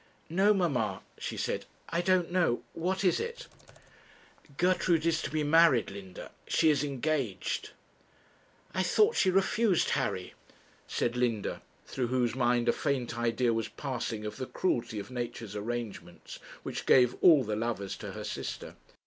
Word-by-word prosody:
'No, 195 +5 +4
mamma,' 130 - 0 0.2
she - - -4
said. - - -2 0.2
'I 170 +1 0
don't 180 -1 +2
know 175 -10 +1
what 185 +4 -1
is 180 - +3
it?' 470 +1 -5 1.1
'Gertrude 175 -2 +2
is 165 -1 +2
to - - -3
be 155 0 -1
married, 150 -8 +4
Linda. 95 -2 -9 0.2
She 160 -1 +4
is 145 -1 +1
engaged.' 140 -6 -2 1.0
'I 185 - 0
thought 430 - +3
she 190 - +3
refused 195 +1 +2
Harry,' - - -1 0.5
said 120 - -1
Linda, 120 -4 -1 0.2
through 125 -2 -2
whose 125 -1 +1
mind 120 -1 +1
a 120 - +4
faint 130 -4 -1
idea 120 0 +1
was 115 -1 -1
passing 120 -6 -4
of 105 0 -5
the 130 -1 -4
cruelty 120 -11 -1
of 105 +5 -6
nature's 120 -4 -5
arrangements, 115 +1 -6 0.2
which - - -5
gave 125 -2 +6
all 155 -7 +7
the 105 -2 -2
lovers 110 -3 -2
to - - -7
her - - -6
sister. - - -5
130 Hz, 150 wpm, -30 LUFS, 115-170 Hz, 1.1 s, all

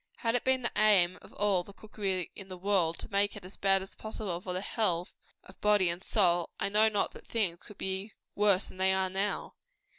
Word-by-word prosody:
Had 230 -2 0
it 245 - +1
been 260 -1 +2
the 240 - 0
aim 190 -4 +4
of - - -15
all 200 -3 +2
the 200 - -13
cookery 195 -4 -3
in 195 - -9
the 185 -1 -8
world, 180 -3 +1
to - - -7
make 200 +1 +1
it 200 -3 -10
as 185 - -10
bad 195 -1 +2
as 190 - -10
possible 210 -5 -5
for 185 - -5
the 180 - -2
health 185 -4 -1 0.3
of - - -17
body 205 -4 +4
and 170 +2 -3
soul, 175 -5 +2
I - - 0
know 215 +2 +5
not 205 -2 0
that - - -14
things 190 -7 -1
could 210 - -13
have - - -40
been 190 +2 -3 0.2
worse 200 -2 +3
than - - -12
they 190 0 +3
are 190 -1 +1
now. 195 +2 -2
195 Hz, 235 wpm, -30 LUFS, 185-210 Hz, 0.3 s, know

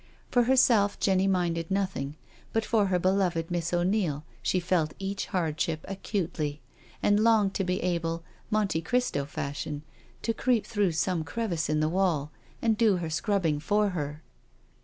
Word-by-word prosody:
For 245 -1 +4
herself 235 -5 +4
Jenny 190 0 +3
minded 170 -3 0
nothing, 185 -8 -1 0.4
but 225 -1 +1
for 215 -3 +2
her 185 -1 +2
beloved 180 -2 +1
Miss 170 -1 -1
O'Neil 175 -4 +1 0.2
she 185 - +1
felt 170 -3 0
each 195 +1 -3
hardship 160 -2 -1
acutely, 175 -6 -3 0.4
and 205 0 +4
longed 215 -3 +4
to 195 - 0
be 180 0 0
able, 165 -2 -1 0.3
Monte 210 -6 +1
Cristo 205 - 0
fashion, 145 +1 -4 0.4
to 230 - +1
creep 230 -3 +1
through 205 -5 +1
some 165 +1 0
crevice 170 -1 -2
in 155 0 +2
the 155 - +2
wall 165 -4 +1 0.3
and 225 -2 +2
do 220 -4 +5
her 170 -3 -3
scrubbing 165 -4 +1
for 205 +6 +2
her. 150 -3 -4
180 Hz, 155 wpm, -28 LUFS, 160-205 Hz, 0.4 s, do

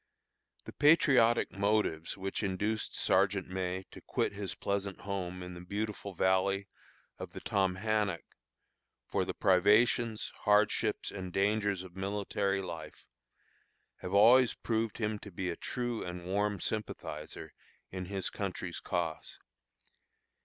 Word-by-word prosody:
The - - -8
patriotic 135 -6 +5
motives 100 -5 0
which 95 0 -3
induced 105 +2 -1
Sergeant 95 0 +2
May 95 0 -3
to - - -11
quit - - -1
his 100 -1 -4
pleasant 100 -1 -2
home 90 -2 -4
in 90 0 -7
the 85 - -9
beautiful 100 +1 -4
valley 95 +2 +2 0.5
of - - -7
the - - -6
Tomhannock, 100 0 0 0.8
for - - 0
the - - -4
privations, 105 +4 +3
hardships, 105 +1 +2
and 95 -2 -6
dangers 100 0 +1
of 90 -1 -12
military 100 0 -1
life, 80 -4 -8 0.9
have 90 +2 -4
always 120 +4 +7
proved 115 -1 -1
him 105 -2 -1
to 100 - -10
be 90 -1 -3
a - - -4
true 120 +2 -3
and 90 0 -6
warm 100 +2 0
sympathizer 80 -7 -5 0.4
in 95 -1 -4
his 95 0 -3
country's 90 -3 -4
cause. 85 -3 -3
100 Hz, 125 wpm, -32 LUFS, 95-105 Hz, 0.9 s, always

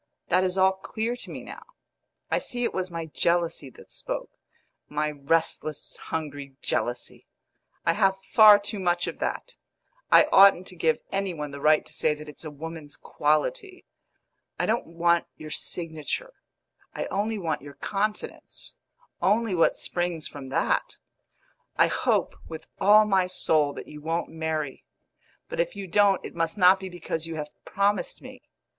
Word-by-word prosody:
That 185 +1 +4
is 185 0 -1
all 190 0 +5
clear 220 +5 -3
to - - -8
me - - -7
now; - - -9 0.7
I - - +3
see 245 0 -3
it - - 0
was 185 0 -2
my 165 -1 -5
jealousy 165 -2 0
that - - -16
spoke - - -5 0.6
my 150 0 -1
restless, 155 +1 -1
hungry 145 -3 -5
jealousy. 120 0 -2 0.6
I 165 - +4
have 195 0 +2
far 215 -2 +9
too 205 +1 -5
much 175 -1 +1
of - - -6
that; - - -4 0.5
I - - +9
oughtn't 195 -2 +7
to 185 - -12
give 160 -2 +1
any 195 -2 -1
one 150 -2 -5
the 140 0 -8
right 155 +1 +4
to - - -11
say 155 -1 +1
that 150 0 -11
it's 150 - -5
a 155 - -5
woman's 155 0 -8
quality. 365 - -1 0.7
I - - 0
don't 230 +2 0
want 170 +1 +2
your 155 0 -9
signature; 165 - -3 0.6
I - - -2
only 210 +3 -1
want 165 -5 -2
your 140 0 -11
confidence 210 +1 -3 0.4
only 215 +1 +2
what 165 -2 +3
springs 175 -3 -2
from 140 -2 -9
that. 130 - 0 0.8
I - - +6
hope - - 0
with 160 -1 -8
all 210 +2 +7
my 190 -3 +2
soul 155 -5 +3
that - - -8
you 150 0 -10
won't 165 +2 -2
marry; 160 -3 -3 0.6
but - - -6
if 170 - 0
you 200 -1 -5
don't 195 +2 +3
it - - -7
must 165 +3 -1
not 185 0 +6
be 190 0 -6
because 165 -2 -4
you 165 - -5
have 150 -1 -6
promised 200 +1 0
me. - - -11
170 Hz, 165 wpm, -26 LUFS, 155-195 Hz, 0.8 s, far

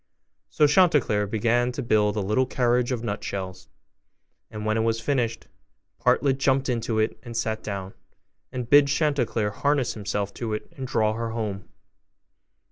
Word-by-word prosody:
So 150 - +3
Chanticleer 145 - +3
began 120 +4 +1
to - - -4
build 105 -3 +2
a 105 - 0
little 110 +7 +1
carriage 125 0 +1
of 120 -2 -2
nutshells: 100 -3 -5 0.8
and 105 0 -7
when 110 0 +1
it - - +1
was 115 0 0
finished, 115 -2 -1 0.5
Partlet 135 -2 +2
jumped 135 0 +2
into 115 -2 -1
it 110 +1 0
and 120 -2 -7
sat 110 -1 -1
down, 100 -2 -5 0.6
and 125 -2 -4
bid 145 +2 +6
Chanticleer 140 -7 0
harness 140 +2 0
himself 100 -1 -3
to 115 -3 -4
it 105 - -8
and 130 -1 -5
draw 110 -4 +1
her 115 +1 -3
home. 105 -4 -4
115 Hz, 155 wpm, -25 LUFS, 105-130 Hz, 0.8 s, bid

